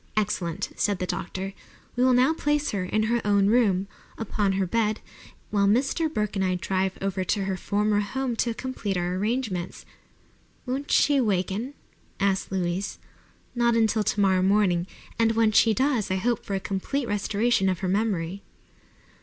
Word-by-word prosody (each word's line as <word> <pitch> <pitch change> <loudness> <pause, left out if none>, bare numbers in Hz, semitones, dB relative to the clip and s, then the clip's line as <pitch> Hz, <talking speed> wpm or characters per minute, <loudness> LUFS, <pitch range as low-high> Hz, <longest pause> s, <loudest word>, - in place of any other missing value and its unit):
"Excellent!" 185 -6 -1
said 205 -2 0
the 180 - -2
doctor. 190 +2 -4 0.4
"We 245 - +2
will 255 -1 +5
now 255 +5 +4
place 295 -2 0
her 195 -3 -2
in 215 +4 0
her 235 +2 +1
own 200 -1 +3
room, 205 -5 +3 0.3
upon 210 -3 -1
her 190 0 0
bed, 215 +2 0 0.5
while 200 -1 +3
Mr. 270 +9 +1
Burke 210 -5 -2
and 195 - 0
I 185 -1 +1
drive 190 +1 -1
over 195 -1 -1
to 200 +2 0
her 190 0 -1
former 205 +3 0
home 250 +4 -2
to 230 -1 0
complete 225 -7 -3
our 175 0 -1
arrangements." 205 -2 -2 0.8
"Won't 270 +3 -3
she 285 -2 +4
waken?" 210 +5 -1 0.4
asked 195 -1 0
Louise. 185 +1 -2 0.6
"Not 235 -1 +2
until 220 -1 +2
tomorrow 195 -2 +2
morning, 190 -3 +2 0.3
and 225 0 +3
when 225 -1 +3
she 225 +1 +5
does 255 -1 +1
I 190 - +1
hope 230 +4 0
for 200 - -3
a - - 0
complete 220 +8 -3
restoration 205 0 +1
of 185 - -2
her 190 - -1
memory." 195 -2 -1
205 Hz, 165 wpm, -26 LUFS, 190-235 Hz, 0.8 s, will